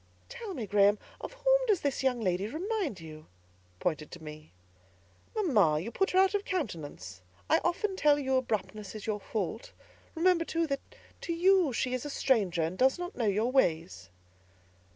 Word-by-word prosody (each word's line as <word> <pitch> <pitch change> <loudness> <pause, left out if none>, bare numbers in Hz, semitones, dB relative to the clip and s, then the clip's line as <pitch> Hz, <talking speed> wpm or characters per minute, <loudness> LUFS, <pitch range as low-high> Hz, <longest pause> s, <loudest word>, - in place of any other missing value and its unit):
"Tell 470 -6 -7
me, 230 - -4
Graham, 205 +1 +4 0.2
of - - -7
whom - - +3
does 410 -6 +2
that 280 -2 -1
young 255 -3 +1
lady 185 0 0
remind 340 - -3
you?" 155 -1 -11 0.5
pointing 155 -3 -1
to 175 - -11
me. 155 0 -10 0.8
"Mamma, 215 - +3
you 205 +9 -5
put 390 +8 +1
her 370 - 0
out 380 +1 +5
of 410 -1 0
countenance. 155 - -5 0.3
I - - +6
often 380 +3 0
tell 295 -5 +4
you 265 -2 0
abruptness 215 -5 -2
is 215 - -7
your 215 -1 -1
fault; 215 +2 -4 0.4
remember, 340 0 +3
too, 330 0 -1
that 275 -3 -2 0.4
to 340 - -2
you 360 -2 +4
she 250 +1 -1
is 255 - -2
a 295 - -5
stranger, 200 - +1
and 165 +4 -3
does 265 +4 +4
not 355 +1 -6
know 230 - 0
your 215 +5 +1
ways." 160 - 0
250 Hz, 175 wpm, -30 LUFS, -, 0.8 s, I